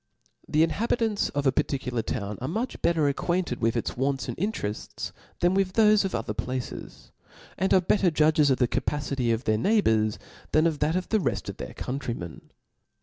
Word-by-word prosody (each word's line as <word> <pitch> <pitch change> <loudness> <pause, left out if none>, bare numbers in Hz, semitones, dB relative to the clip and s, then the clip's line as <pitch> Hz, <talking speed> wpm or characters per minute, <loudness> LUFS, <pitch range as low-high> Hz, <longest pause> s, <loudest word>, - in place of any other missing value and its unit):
The 155 +2 +4
inhabitants 220 +4 0
of 145 0 -2
a 135 - +5
particular 125 -3 -1
town 105 -1 -4
art 130 - -2
much 225 +9 -3
better 160 -4 +2
acquainted 170 -1 -1
with 115 +1 +1
its 115 - -2
wants 135 -1 -1
and - - -4
interefts, 160 - -4 0.3
than 175 +1 +4
with 190 -1 +1
thofe 215 -1 +5
of 195 - -2
other - - -2
places 130 -1 -5 0.2
•, - - -20
and 190 +1 0
are 190 - +6
better 190 +1 +3
judgtt 155 -1 +3
of 130 - +3
the 125 - +2
capacity 140 -3 -1
of 115 +2 0
their 110 -2 +1
neighbours, 110 - +2 0.4
than 155 +1 +4
of 160 -3 +1
that 155 +3 +1
of 185 0 -2
the 220 - +3
reft - - -2
of - - -7
their - - -7
countrymen. 120 - -5
150 Hz, 190 wpm, -26 LUFS, 125-185 Hz, 0.4 s, are